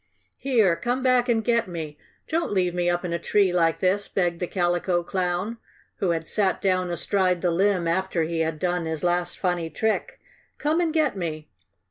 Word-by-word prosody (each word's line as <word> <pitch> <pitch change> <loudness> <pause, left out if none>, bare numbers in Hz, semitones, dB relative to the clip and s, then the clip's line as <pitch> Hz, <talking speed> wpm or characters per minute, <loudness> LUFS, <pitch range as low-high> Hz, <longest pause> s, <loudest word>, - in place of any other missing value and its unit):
"Here! 225 -10 +3
Come 245 +9 -2
back 255 -1 +3
and 225 -2 +2
get 235 -1 +1
me! 160 -4 -6 0.3
Don't 330 +1 -1
leave 180 -3 +1
me 175 0 0
up 175 +1 -1
in 170 - -3
a 170 - -1
tree 195 +1 +2
like 165 -2 +2
this!" 195 +2 +1
begged 175 -3 -1
the 180 - -2
Calico 175 -1 0
Clown, 185 +5 -2 0.4
who 190 - 0
had 165 -1 -1
sat 200 -3 +2
down 185 -2 +1
astride 180 +1 0
the 175 - +2
limb 185 0 +2
after 180 0 0
he 165 +1 -2
had 160 -1 -1
done 175 0 -1
his 160 0 -3
last 175 0 0
funny 175 -3 -1
trick. 220 +5 -2 0.4
"Come 310 +3 +1
and 335 -2 +1
get 305 -7 +1
me!" 155 -4 -5
180 Hz, 190 wpm, -25 LUFS, 170-205 Hz, 0.4 s, Here